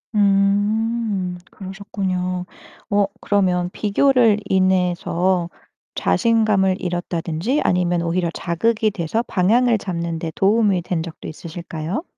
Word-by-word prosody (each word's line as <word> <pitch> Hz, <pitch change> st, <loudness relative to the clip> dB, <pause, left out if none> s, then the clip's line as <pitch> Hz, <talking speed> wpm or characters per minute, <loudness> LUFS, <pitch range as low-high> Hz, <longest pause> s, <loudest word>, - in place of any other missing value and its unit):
음. 205 Hz, -1 st, +1 dB
그러셨군요. 185 Hz, -2 st, -4 dB, 0.4 s
어 205 Hz, -1 st, +3 dB, 0.2 s
그러면 180 Hz, -3 st, +1 dB
비교를 225 Hz, +1 st, +3 dB
인해서 180 Hz, -1 st, +1 dB, 0.5 s
자신감을 215 Hz, -5 st, +2 dB
잃었다든지 175 Hz, -, -2 dB
아니면 175 Hz, -1 st, +1 dB
오히려 170 Hz, 0 st, 0 dB
자극이 215 Hz, +5 st, 0 dB
돼서 200 Hz, +5 st, -2 dB
방향을 230 Hz, +5 st, +2 dB
잡는 170 Hz, -4 st, -4 dB
데 160 Hz, -1 st, -4 dB
도움이 200 Hz, -3 st, +2 dB
된 175 Hz, -3 st, -2 dB
적도 165 Hz, -1 st, -9 dB
있으실까요? 170 Hz, -, -5 dB
190 Hz, 260 characters per minute, -21 LUFS, 175-210 Hz, 0.5 s, 어